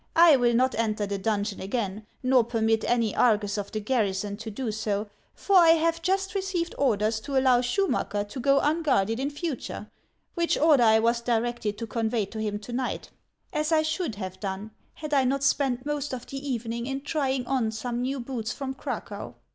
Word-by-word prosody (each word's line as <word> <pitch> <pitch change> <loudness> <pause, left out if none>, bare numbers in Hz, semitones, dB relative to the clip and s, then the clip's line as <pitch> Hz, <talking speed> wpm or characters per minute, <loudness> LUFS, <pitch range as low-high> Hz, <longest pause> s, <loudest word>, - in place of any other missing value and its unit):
I 330 -2 +8
will 240 -2 +2
not 255 +2 +3
enter 215 -2 0
the 200 0 -3
donjon 205 0 -1
again, 210 0 -3 0.2
nor 255 -1 +4
permit 225 -1 +1
any 230 -3 +1
Argus 210 -4 +2
of 200 0 -5
the 215 - -2
garrison 205 -3 -1
to 220 +1 -6
do 220 +2 -3
so; 210 -1 -2 0.2
for 400 - 0
I 335 -3 +8
have 330 +1 0
just 385 +2 0
received 375 -4 -2
orders 220 -4 +2
to 275 +4 -3
allow 255 -2 +4
Schumacker 245 - 0
to 255 - -7
go 275 +2 +4
unguarded 290 -9 +1
in 275 +2 -1
future, 295 -1 -5 0.4
which 340 -1 +1
order 300 -4 +5
I 220 -1 +6
was 235 +1 +2
directed 235 -2 -1
to 230 - -4
convey 225 -1 -1
to 220 +3 -8
him 210 -1 -2
to 240 +3 -8
night, 250 0 -3 0.2
— - - -42
as 305 +1 0
I 315 -1 +4
should 315 - -2
have 190 -2 -6
done 195 +2 -5 0.2
had 305 -1 -6
I 275 -2 +4
not 270 +2 0
spent 270 -2 +1
most 290 -2 -2
of 245 - -9
the 275 +1 -6
evening 235 -1 -3
in 270 0 -3
trying 270 -3 -1
on 250 -4 0
some 235 +2 -3
new 265 +2 -2
boots 235 -3 -4
from 265 +3 -4
Cracow. 265 - -6
245 Hz, 195 wpm, -26 LUFS, 220-280 Hz, 0.4 s, I